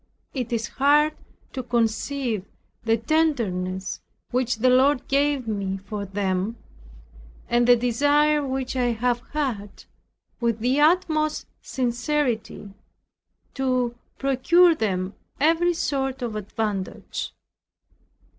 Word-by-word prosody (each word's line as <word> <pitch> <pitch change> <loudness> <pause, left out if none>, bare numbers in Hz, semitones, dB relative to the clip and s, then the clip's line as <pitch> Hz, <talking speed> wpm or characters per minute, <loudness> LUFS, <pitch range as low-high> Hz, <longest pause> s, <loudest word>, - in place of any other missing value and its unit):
It 250 -4 -3
is 230 -1 -1
hard 295 +3 +3 0.4
to 260 - -3
conceive 235 -1 -1 0.4
the 225 0 +3
tenderness 220 - 0 0.3
which 250 -1 +1
the 240 +4 +2
Lord 260 +1 +3
gave 280 -2 +1
me 200 -3 -2
for 200 +1 -6
them, 195 +2 -2 0.9
and 240 0 +2
the 245 - +8
desire 290 +5 +2
which 265 -1 -3
I 245 -2 +1
have 240 +1 0
had, 230 -10 -3 0.6
with 235 -3 +1
the 250 +5 +1
utmost 310 -2 +2 0.2
sincerity, 245 -5 -2 0.8
to 255 -3 0 0.2
procure 330 +7 +4
them 190 -7 -2 0.3
every 330 +4 +3
sort 270 -4 -1
of 230 -3 -3
advantage. 210 -2 -4
245 Hz, 105 wpm, -24 LUFS, 220-285 Hz, 0.9 s, the